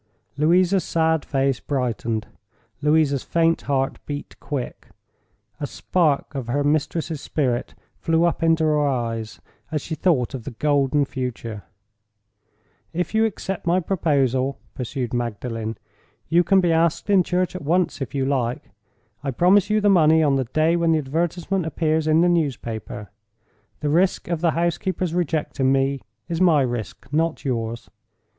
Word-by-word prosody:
Louisa's 175 +5 +3
sad 160 -2 +1
face 135 -2 0
brightened; 115 -5 -2 0.6
Louisa's 150 -2 +3
faint 165 0 +1
heart 135 -1 0
beat 145 -1 -6
quick. 135 -4 -5 0.7
A 145 - -3
spark 155 -4 0
of 135 -4 -4
her 140 +4 0
mistress's 155 +1 -1
spirit 125 -5 -1 0.2
flew 165 0 +2
up 170 0 +1
into 165 0 +3
her 150 -1 +2
eyes 115 -5 -2 0.3
as 155 - 0
she 160 - -5
thought 150 -6 +1
of 130 -4 -5
the - - -5
golden 145 -1 +2
future. 120 -5 -5 1.3
"If 180 +4 -2
you 220 0 +4
accept 195 -4 -4
my 175 +2 +3
proposal," 140 -7 +1 0.2
pursued 125 -1 -4
Magdalen, 115 -2 -3 0.5
"you 170 +2 +4
can 195 +1 +4
be 175 -2 +2
asked 165 +2 +1
in 200 -2 +5
church 180 +1 -1
at 185 - -5
once, 170 +1 0
if 135 - -4
you 135 -1 +1
like. 125 -5 -1 0.5
I 140 - -2
promise 180 - +4
you 215 0 +2
the 205 - +3
money 160 -4 +5
on 140 -2 +3
the 135 -1 0
day 155 +7 +2
when 170 -1 +2
the - - +3
advertisement 170 +5 -1
appears 160 -1 0
in 155 +1 +4
the 175 - +4
newspaper. 120 - -2 0.7
The 150 - 0
risk 175 +3 +1
of 170 -2 -1
the 170 - +3
housekeeper's 175 +1 -1
rejecting 150 -5 0
me 135 0 +1 0.3
is 170 +1 -2
my 160 -6 +5
risk—not 145 +7 -2
yours. 115 -2 -3
150 Hz, 150 wpm, -23 LUFS, 130-170 Hz, 1.3 s, in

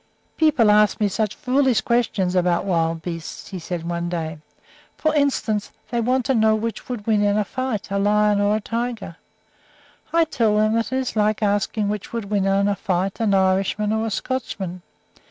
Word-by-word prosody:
"People 275 -9 +4
ask 210 0 +4
me 210 - +2
such 210 +1 -1
foolish 260 -2 +2
questions 215 -6 0
about 180 0 +2
wild 165 -3 0
beasts," 165 -2 -6
he 190 - -6
said 170 0 -5
one 170 0 -2
day. 160 -3 -4 0.6
"For 310 -1 +1
instance, 270 -8 0 0.2
they 235 -1 0
want 250 +1 +1
to 270 - +2
know 220 -2 +4
which 225 +3 -4
would 235 -5 -5
win 215 -2 +2
in 205 0 +2
a 210 - +2
fight, 245 -2 -4
a 200 - 0
lion 210 0 +3
or 205 +1 +2
a - - 0
tiger. 230 -5 -4 0.9
I 335 0 +4
tell 230 -9 +1
them 215 +1 +3
that 230 +1 0
is 260 -2 -2
like 215 0 +1
asking 205 +1 0
which 210 +1 -4
would 220 -3 -4
win 200 -2 +1
in 195 +1 +2
a 205 - +1
fight, 190 +1 -2
an 215 -3 +2
Irishman 195 +2 +1
or 220 +1 0
a - - -1
Scotchman. 195 -6 -4
210 Hz, 190 wpm, -22 LUFS, 195-230 Hz, 0.9 s, People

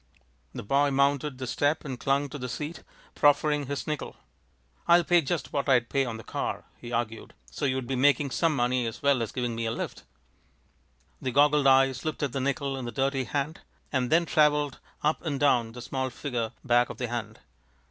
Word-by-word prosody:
The - - -5
boy 140 +6 +2
mounted 140 0 +1
the 130 - -4
step 145 +5 0
and 130 -4 -5
clung 140 +3 +1
to 145 - -7
the 125 0 -4
seat, 150 +8 -5 0.3
proffering 145 -1 +3
his 140 0 -3
nickel. 150 -2 -4 0.7
"I'll 170 0 +6
pay 175 0 +4
just 135 - -3
what 140 -1 -1
I'd 125 -3 +3
pay 135 -1 +1
on 115 -2 -4
the 110 - -10
car," - - -3
he 120 - -10
argued, 115 -1 -3 0.2
"so 65 - -3
you'd 130 -1 0
be 135 +2 -2
making 140 +1 +3
some 165 +1 +1
money 125 -1 +1
as 115 - -7
well 140 -3 +3
as 115 - -3
giving 120 -2 -2
me 115 0 -2
a - - -1
lift." - - -5 1.2
The 130 - -1
goggled 145 +1 +4
eyes 135 0 +4
looked 155 -1 -3
at 140 - 0
the 135 - -1
nickel 140 0 -1
in 130 - -5
the 120 - -4
dirty 135 +2 0
hand, 145 +6 -2 0.3
and 130 -3 0
then 170 +2 +4
traveled 150 -3 +2 0.2
up 150 +1 +1
and 145 -5 -2
down 120 -6 +2
the 125 0 -8
small 130 +1 -2
figure 120 -4 -3
back 120 -1 +3
of - - -7
the 125 - -2
hand. 120 -1 -5
135 Hz, 205 wpm, -27 LUFS, 125-145 Hz, 1.2 s, I'll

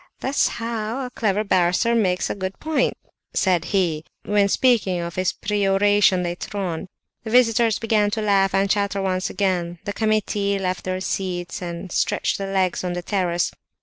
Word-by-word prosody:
"That's 270 +2 +1
how 230 +2 -3
a 250 - -7
clever 210 -3 0
barrister 185 +3 +2
makes 185 -6 +1
a - - -2
good 190 -1 -5
point!" 305 -4 0 0.4
said 185 -3 +2
he, 170 -6 0 0.2
when 205 -1 +2
speaking 210 -7 +2
of 170 0 -4
his 185 +1 0
peroration 200 -1 +2
later 175 +4 -5
on. 180 -2 -3 0.4
The 220 - -6
visitors 230 -2 +4
began 215 -2 +2
to 220 +1 -2
laugh 195 -2 +3
and 195 +1 +3
chatter 200 0 0
once 185 -1 -1
again; 175 -3 -1
the 205 - -3
committee 210 -2 0
left 185 -1 -3
their 185 0 -2
seats, 180 -2 -3
and 175 +1 -6
stretched - - 0
their 195 0 -4
legs 190 -2 0
on 180 -1 -2
the 175 0 -4
terrace. 175 -3 0
195 Hz, 170 wpm, -22 LUFS, 185-215 Hz, 0.4 s, visitors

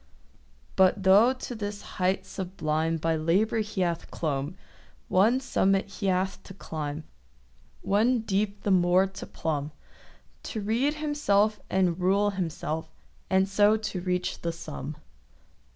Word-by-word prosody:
But 190 +1 +4
tho' 200 +6 +6
to 255 -1 -6
this 205 -2 -5 0.2
height 190 +1 +1
sublime 165 -4 -2
By 160 +1 0
labour 185 +8 +1
he 210 -3 -2
hath 170 -2 -1
clomb, 145 +1 -2 0.5
One 220 +8 +4
summit 195 -7 +1
he 200 0 -4
hath 190 +1 0
to 195 - -11
climb, 155 -4 -5 0.8
One 225 +4 +2
deep 205 -1 -1
the 205 - +1
more 180 +1 +4
to 195 0 -8
plumb— 150 -2 -3 0.7
To 220 - -5
rede 235 +8 0
himself 220 -9 +1
and 185 -2 +1
rule 200 +3 +2
himself, 160 -4 -3 0.4
And 190 0 +3
so 205 +2 +4
to 210 -4 -4
reach 180 0 -2
the 170 - -1
sum. 155 -3 -7
190 Hz, 135 wpm, -27 LUFS, 170-210 Hz, 0.8 s, tho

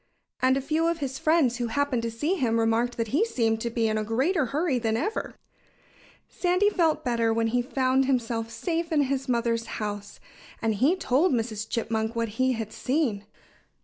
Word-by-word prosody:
And 260 +1 +4
a - - -1
few 320 +4 0
of 335 0 0
his 270 -3 -4
friends 310 -7 +3
who 240 -2 -2
happened 275 0 0
to 230 - -2
see 295 +10 -1
him 235 -10 +1
remarked 230 +2 +1
that 230 -2 -2
he 300 - +2
seemed 225 - 0
to 235 - -1
be 230 -1 0
in 215 0 0
a - - -1
greater 265 - +1
hurry 285 0 0
than 225 -1 0
ever. 420 - -3 0.9
Sandy 365 +3 +1
felt 320 -5 +1
better 230 -2 +1
when 225 0 +1
he 245 +2 +1
found 260 +1 +1
himself 230 -3 -1
safe 335 - -3
in 300 -2 +3
his 270 -1 -2
mother's 230 -1 0
house. 205 -2 -5 0.4
And 225 -1 0
he 270 - +3
told 310 -1 +2
Mrs. 220 -2 -2
Chipmunk 220 -1 -2
what 230 -1 -1
he 260 0 +3
had 220 -2 -5
seen. 250 -8 -1
245 Hz, 190 wpm, -26 LUFS, 225-290 Hz, 0.9 s, And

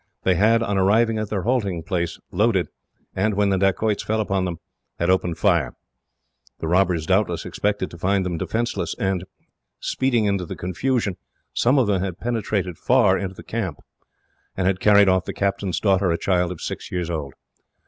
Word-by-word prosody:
They 95 - +3
had, 110 +5 +3
on 100 -3 0
arriving 110 +3 +3
at 110 -2 -3
their 100 -4 -2
halting 100 -9 0
place, 85 -2 -2
loaded; 100 -1 +2 0.5
and, 105 +2 +1
when 100 0 +2
the 95 - +2
dacoits 100 +2 +1
fell 110 +1 -1
upon 95 -3 0
them, 85 -2 -3 0.4
had 85 +2 +2
opened 90 -3 0
fire. 85 - +2 0.8
The 80 - -4
robbers 90 -2 +2
doubtless 95 -1 +1
expected 105 -2 -2
to 85 - -11
find 95 +1 +1
them 85 -3 -2
defenceless, 120 +6 -2
and 95 -2 -1 0.5
speedily 120 -5 +1
fled. 100 -2 0
In 90 - -6
the - - -5
confusion, 100 +2 -1 0.4
some 125 +4 +3
of 130 - +4
them 100 -3 +1
had 95 -2 -3
penetrated 105 -7 -2
far 120 -7 +4
into 95 -1 -4
the - - -11
camp, 95 -10 -3 0.8
and 95 - 0
had 95 0 +1
carried 100 0 +6
off 95 -1 +3
the - - -4
captain's 100 -2 -1
daughter, 95 -2 +2
a 85 - +1
child 90 -1 +1
of 90 - -8
six - - -6
years 90 -1 -2
old. 75 -5 -4
95 Hz, 185 wpm, -23 LUFS, 90-105 Hz, 0.8 s, carried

